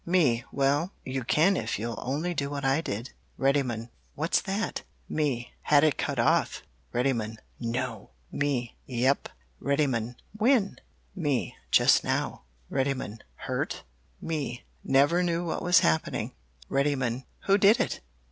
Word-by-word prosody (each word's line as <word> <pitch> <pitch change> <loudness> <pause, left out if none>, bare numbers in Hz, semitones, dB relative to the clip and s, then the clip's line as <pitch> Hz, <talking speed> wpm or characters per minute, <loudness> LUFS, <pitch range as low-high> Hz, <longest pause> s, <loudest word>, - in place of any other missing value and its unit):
"Me 150 -10 +3
Well, 145 +6 +1
you 130 0 -2
can 165 +10 +4
if - - -1
you'll 115 +2 -4
only 150 +7 -1
do 140 -4 -1
what 140 -1 -3
I 135 +4 +3
did. 115 -3 -5 0.2
"Reddymun 130 -4 +1 0.3
What's 160 +4 +1
that? 205 +2 -2 0.3
"Me 140 -6 -1
Had 145 -1 +5
it 155 -5 +3
cut - - -1
off. - - +2 0.3
"Reddymun 120 -3 0 0.2
No! 120 -2 -3 0.2
"Me 135 -5 -1
Yep! 130 +2 +1 0.3
"Reddymun 130 -5 0 0.2
When? 220 -1 +2 0.4
"Me 145 -8 -1
Just - - +5
now. - - -1 0.3
"Reddymun 130 -5 -1 0.3
Hurt? - - -2 0.4
"Me 145 -6 -3 0.2
Never 145 +6 +4
knew 175 -1 0
what 165 - -2
was 180 0 +5
happening. 80 0 +1 0.4
"Reddymun 135 -3 0 0.2
Who 200 +1 +3
did 205 +5 +6
it? - - 0
140 Hz, 130 wpm, -28 LUFS, 125-165 Hz, 0.4 s, did